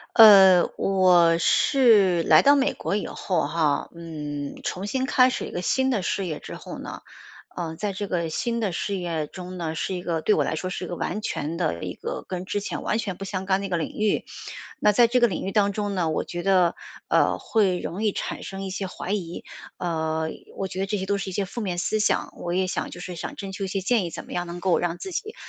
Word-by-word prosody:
呃， 195 -6 +9
我 180 -3 +4
是 205 - +4
来 - - +6
到 285 +1 +7
美 275 -1 +2
国 - - -2
以 210 - -2
后 170 -6 -1
哈， 155 -2 0
嗯， 150 -4 -6
重 185 +2 -3
新 260 +5 -1
开 255 -1 +5
始 - - -3
一 - - -9
个 175 - -4
新 265 +7 +2
的 220 -8 0
事 190 +2 -1
业 155 -3 -4
之 - - -9
后 - - -8
呢， - - -8 0.6
呃， 165 -2 -3
在 205 +4 -3
这 200 +2 -4
个 170 -3 -1
新 235 +8 -1
的 210 -4 0
事 200 +3 -2
业 170 -4 -2
中 180 +3 -8
呢， 165 -2 -3
是 185 +3 -2
一 180 - -5
个 165 -2 -1
对 210 - +3
我 - - +2
来 - - -2
说 185 +4 -3
是 185 - -4
一 - - -7
个 175 - -4
完 185 +4 -3
全 165 -5 -3
的 155 - -1
一 - - -4
个 - - -5
跟 185 0 -4
之 205 - -1
前 205 - -5
完 215 - 0
全 195 -5 -3
不 195 - -6
相 190 -1 -4
干 190 0 +2
的 200 - -4
一 195 - -5
个 175 - 0
领 - - -1
域。 215 0 +1 0.6
那 210 - +4
在 235 +4 +5
这 250 +2 +2
个 240 - +5
领 185 - -4
域 195 - -3
当 200 -1 +3
中 205 -1 -2
呢， 175 -4 0
我 155 - -1
觉 175 - -5
得， 180 -2 +3 0.3
呃， - - +3
会 195 -5 +1
容 195 +6 -4
易 215 - +3
产 - - -4
生 195 0 -6
一 190 - -4
些 195 +1 -3
怀 180 0 -6
疑。 180 -4 -3 0.3
呃， 160 -2 -1 0.3
我 195 - -2
觉 190 - -6
得 195 - -1
这 210 +1 -1
些 190 - -3
都 200 +1 0
是 195 - -4
一 - - -7
些 200 +2 -1
负 215 +5 -6
面 185 -4 -2
思 215 +4 0
想， 210 - +1
我 175 - -4
也 185 +2 +1
想 185 - -3
就 - - -9
是 180 0 -6
想 165 - -6
征 195 -1 -6
求 195 +1 -4
一 - - -4
些 195 +1 -2
建 215 +2 +1
议， - - -3
怎 - - -8
么 - - -13
样 175 0 -2
能 170 +1 -6
够 180 -1 +2
让 175 0 -1
自 380 - -7
己， 430 +5 -4
185 Hz, 280 characters per minute, -25 LUFS, 175-205 Hz, 0.6 s, 呃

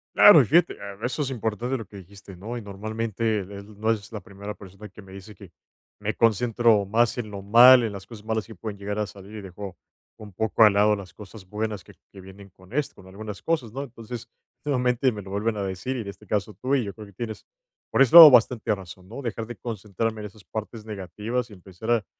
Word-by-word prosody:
Claro, 175 -8 +9
y 125 - +1
fíjate. 170 +6 +3
Ah, 100 -1 -8
eso 130 +4 -1
es 135 - -3
importante, 120 +1 -2
lo 115 - -6
que 100 - -13
dijiste, 95 0 -13
¿no? 110 +6 -6
Y - - -6
normalmente, 110 +1 -3
del 100 +1 -11
No 110 +2 -1
eres 110 0 -4
la 105 - -5
primera 100 +2 -8
persona 100 +1 -12
que 100 +2 -14
me 95 -1 -15
dice 100 +2 -11
que 95 -2 -14 0.5
me - - -2
concentro 115 -1 +3
más 115 +5 +1
en 115 -3 -4
lo 100 -1 -7
mal, 120 +5 +8
en 110 - -2
las 100 -1 -9
cosas 110 -3 -11
malas 110 -1 -2
que 110 - -11
pueden 105 +2 -7
llegar 100 +1 -4
a 105 -1 -1
salir, 100 +2 -12
y 105 - -6
dejo 95 0 -8 0.4
un 105 -2 -11
poco 110 +4 +2
al 105 - +8
lado 105 +1 +4
las 95 -3 -10
cosas 100 0 -12
buenas 105 -1 -4
que - - -16 0.2
que 95 - -11
vienen 95 +1 -13
con 95 +2 -19
esto, 145 +1 -2
con 95 -1 -16
algunas 105 +1 -8
cosas, 130 -10 -2
¿no? 135 +1 -4
Entonces, 115 -2 -9 0.3
nuevamente 125 -2 +1
me 105 -2 -7
lo 95 0 -11
vuelven 105 +2 -1
a 100 - -2
decir, 95 +7 -4
y - - -3
en 100 - -8
este 100 +1 -10
caso 105 +1 -2
tú, 130 +2 +1
y 125 -6 0
yo 100 - -6
creo 105 -2 -11
que 100 - -17
tienes 110 +2 -6 0.5
por - - +2
ese 135 +3 +4
lado 160 -4 +13
bastante 115 -2 +3
razón, 95 -1 -10
¿no? 140 +5 -7
Dejar 115 -2 -4
de 120 -3 -8
concentrarme 110 0 -4
en 105 - -5
esas 105 0 -18
partes 110 0 -7
negativas 110 +4 -4
y - - -13
empezar 95 +4 -7
a 115 -4 +2
105 Hz, 240 wpm, -25 LUFS, 100-115 Hz, 0.5 s, lado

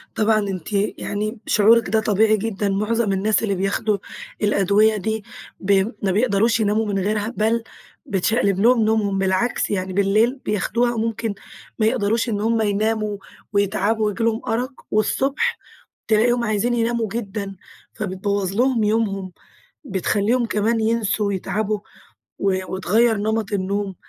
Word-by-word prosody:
طبعًا 215 0 +3
أنتِ 195 -2 -4
يعني 210 +2 -2
شعورِك 230 +2 +4
ده 220 - +2
طبيعي 215 0 +3
جدًا، 205 -1 -2
معظم 210 +2 0
الناس 205 +3 +1
اللي 200 -3 0
بياخدوا 200 +2 0 0.4
الأدوية 210 +1 +3
دي 220 +2 -2 0.4
ب 195 +1 -1 0.3
ما 195 - +2
بيقدروش 225 +2 +2
يناموا 215 +1 +1
من 200 -2 -1
غيرها، 210 +4 -1
بل 225 +2 +1 0.4
بتشقلب 200 -2 +1
لهم 235 +1 +4
نومهم 215 -3 +1
بالعكس 195 +5 0
يعني، 185 -2 -2
بالليل 210 +6 +2
بياخدوها 235 +3 0
ممكن 225 -1 -2 0.5
ما 215 - +3
يقدروش 225 0 +1
إن 205 -2 -1
هُم 225 +1 +1
يناموا 215 0 0 0.4
ويتعبوا 205 +2 +1
وييجي 210 +2 -1
لهم 230 0 +1
أرق، 250 +4 -3
والصبح 270 - +1 0.5
تلاقيهم 235 +2 +3
عايزين 215 +2 0
يناموا 235 -1 0
جدًا، 200 -3 -4 0.4
فبتبوّظ 195 -1 -2
لهم 245 -2 +2
يومهم، 200 -3 0 0.5
بتخليهم 215 +3 0
كمان 225 +1 0
ينسوا 220 -2 0
ويتعبوا 205 +2 -2 0.6
و 190 -1 +1
وتغيّر 215 +5 +2
نمط 215 0 -1
النوم. 200 0 -2
215 Hz, 130 wpm, -21 LUFS, 200-225 Hz, 0.6 s, شعورِك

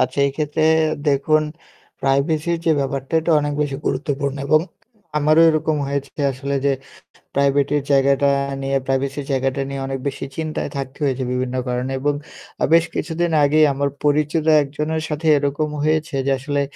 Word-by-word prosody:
আচ্ছা 130 +2 0
এই - - 0
ক্ষেত্রে 155 0 -1 0.5
দেখুন, 145 +2 +3 0.6
প্রাইভেসির 150 +5 +1
যে - - +5
ব্যাপারটা 135 +1 -3
এটা 165 - -1
অনেক 145 0 -2
বেশি 140 -2 -3
গুরুত্বপূর্ণ 140 0 -1
এবং 155 +2 +4 0.6
আমারও 155 +2 +4
এরকম 155 -1 +1
হয়েছে 140 -1 -3 0.2
আসলে 140 +2 -4
যে 140 - +3 0.6
প্রাইভেটের 140 +1 +2
জায়গাটা 140 +1 +3 0.3
নিয়ে 135 0 0
প্রাইভেসির 135 +1 -1
জায়গাটা 135 +1 0
নিয়ে 140 0 -4
অনেক 135 -1 -3
বেশি 135 - -4
চিন্তায় 155 -1 -3
থাকতে 135 +1 -6
হয়েছে 130 -1 -1
বিভিন্ন 125 0 -2
কারণে 125 +2 -2
এবং 145 0 +1 0.5
আ - - +3
বেশ 165 0 +6
কিছুদিন 165 +2 -1
আগেই 155 +2 +5
আমার 140 +1 0
পরিচিত 150 +2 +1 0.2
একজনের 150 +3 -3
সাথে 155 +2 -3
এরকম 145 +2 -1
হয়েছে 155 -1 0
যে 140 - +1
আসলে 145 +1 -1
140 Hz, 155 wpm, -20 LUFS, 135-155 Hz, 0.6 s, বেশ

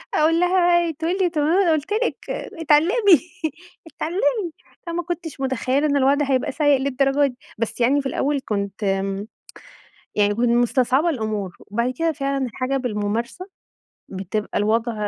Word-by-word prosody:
أقول 325 +2 +3
لها 355 -1 +4
ي - - -3
تقول 330 +5 -2
لي 355 - +3
طب 305 -3 -1
ما 335 +7 +3
أنا 335 - +3
قُلت 310 +7 -2
لِك 470 +3 0
اتعلّمي، 330 - +3 0.7
اتعلّمي، 360 +3 -1 0.4
فما 340 +1 -2
كنتش 335 -4 -5
متخيلة 265 +2 0
إن 285 -1 +2
الوضع 280 +2 +3
هيبقى 260 0 +1
سيء 290 -2 +3
للدرجة 275 +1 +2
دي، 250 -2 -8 0.2
بس 230 +2 -3
يعني 280 +4 +3
في 270 - -3
الأول 285 0 0
كنت 200 0 -3
آمم، 195 +1 -1 0.9
يعني 205 -1 +3
يكون 235 +3 0
كنت 235 - +3
مستصعبة 255 +6 +2
الأمور 215 - -3
وبعد 235 +5 -2
كده 330 -1 +1
فعلًا 275 -2 -1
الحاجة 255 +4 -2
بالممارسة 235 - -3 0.6
بتبقى 195 +2 -3
الوضع 225 +3 +1
275 Hz, 155 wpm, -22 LUFS, 235-325 Hz, 0.9 s, لها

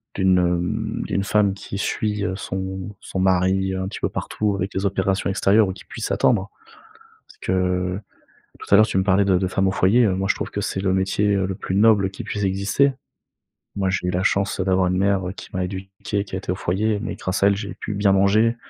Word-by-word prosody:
d'une, 95 -1 +3
hem, 105 +7 -1
d'une 100 - -1
femme 100 -1 +2
qui 100 0 -7
suit, 105 +1 -1
heu, 95 - -2
son 95 +1 -5
son 95 - -5
mari 95 +1 +2
un 95 0 -3
petit 100 - -6
peu - - 0
partout 105 -2 -2
avec 95 +1 -3
les 95 +1 -2
opérations 95 0 0
extérieures 100 +2 +3
ou - - -3
qui - - -14
puisse - - -5
attendre. - - +2 0.8
Parce - - -19
que, 90 0 -1 0.6
tout - - -10
à - - +10
l'heure, 110 - +7
tu - - -1
me 95 - +3
parlais 95 +1 +3
de 95 -2 +3
de 95 - 0
femme 95 +1 0
au - - +2
foyer, 105 +5 +3
heu, 95 - +1
moi 95 +1 -1
je - - +3
trouve - - -5
que 100 - -3
c'est 95 - -2
le 95 -1 +1
métier, 95 +2 +1
heu, 95 -1 +1
le 95 - -3
plus 95 - -4
noble 100 -2 +4
qui 95 - -7
puisse 105 -1 -4
exister. 100 +8 +2 0.8
Moi, 95 -1 +1
j'ai 95 -1 -1
eu - - +1
la 90 +1 -1
chance 100 -1 +1
d'avoir 95 -1 +2
une 90 - 0
mère, 95 -1 +1
heu, 90 - -4
qui - - -11
m'a 95 -1 -1
éduqué, 95 +2 -4
qui 95 - -7
a - - -2
été 95 - -12
au 90 - -1
foyer, 105 +5 0
mais 110 - -4
grâce 95 +1 -2
à - - +7
elle, 100 -1 +2
j'ai 100 0 -5
pu 105 - -5
bien 100 -1 +3
manger. 105 +4 +3
95 Hz, 240 wpm, -22 LUFS, 95-100 Hz, 0.8 s, à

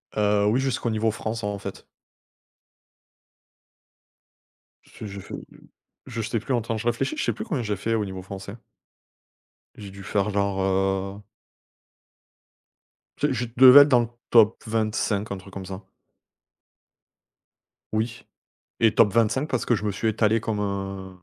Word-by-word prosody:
Heu, 105 -1 +2
oui, 110 +5 +2
jusqu'au 135 -3 -1
niveau 110 0 +1
France, 110 +1 -5
en 105 0 -2
fait. 100 0 -8 3.0
Parce - - -11
je 100 -1 -7
fais - - -8
du - - -19 0.5
je 115 - -6
sais 115 +1 -1
plus, 125 +5 -3
en 120 - 0
temps, 115 0 -3
je 115 +2 -4
réfléchis. 120 - 0
Je 310 - -2
sais - - +1
plus - - -6
combien 165 - -2
j'ai 105 -3 -2
fait 115 +4 -2
au 110 -2 0
niveau 95 -1 -7
français. 100 +1 -8 1.2
J'ai 100 -2 -9
dû 100 0 -11
faire, 100 +1 0
genre, 100 -1 0
heu 95 +1 0 2.0
je - - +1
je 120 - -2
devais 130 +2 +10
être 145 - +5
dans 125 -3 +5
le 120 - -2 0.2
top 115 -2 +5
25 110 -2 -1
un 100 - -5
truc 95 +1 -14
comme 95 -1 -7
ça. 95 +1 -7 2.1
Oui 115 +2 -2 0.6
et 115 -2 +5
top 105 -3 +4
25 115 +6 +1
parce 130 - -1
que 120 - +2
je 105 - -5
me 105 - 0
suis 105 +3 -1
étalé 110 +1 +2
comme 110 -1 -3
un 95 -2 -5
105 Hz, 160 wpm, -25 LUFS, 100-115 Hz, 3.0 s, devais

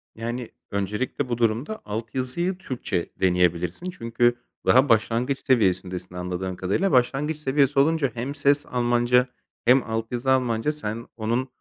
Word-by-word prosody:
Yani, 120 +1 -5 0.2
öncelikle 105 +7 -2
bu 120 - -1
durumda 120 - -1
altyazıyı 130 - -1
Türkçe 125 - -3
deneyebilirsin 90 - +1
çünkü 120 -3 +1 0.3
daha 130 +2 +5
başlangıç 115 +4 +2
seviyesindesin 95 -6 0
anladığım 90 +1 -4
kadarıyla. 100 - 0
Başlangıç 135 +5 +2
seviyesi 140 -1 +2
olunca 145 -2 +2
hem 125 +4 -4
ses 145 0 +2
Almanca 120 0 +2 0.4
hem 125 +2 +5
altyazı 115 +3 -2
Almanca 125 +1 +1
sen 115 -6 -5
onun 120 +4 -1
120 Hz, 125 wpm, -24 LUFS, 110-135 Hz, 0.4 s, daha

